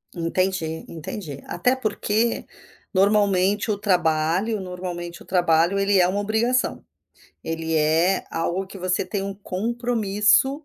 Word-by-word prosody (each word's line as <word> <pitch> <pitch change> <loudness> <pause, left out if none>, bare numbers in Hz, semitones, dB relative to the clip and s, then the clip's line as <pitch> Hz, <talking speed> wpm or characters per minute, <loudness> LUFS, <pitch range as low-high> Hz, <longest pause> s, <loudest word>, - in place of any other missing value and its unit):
Entendi 165 -1 -1
entendi. 155 -3 -7
Até 250 +9 +1
porque, 220 -1 0 0.5
normalmente 200 +1 +3
o 200 - -1
trabalho 180 +2 +1
normalmente 180 -2 -6
o - - -21
trabalho 175 +1 +2
ele 195 -1 +3
é 180 - +5
uma 195 +3 -1
obrigação. 220 +5 0 0.6
Ele 160 0 -3
é 160 +5 +2
algo 170 +3 -2
que 195 +1 -10
você 180 0 0
tem 195 +1 -3
um 195 0 -4
compromisso. 225 +6 +1
190 Hz, 125 wpm, -23 LUFS, 170-210 Hz, 0.6 s, é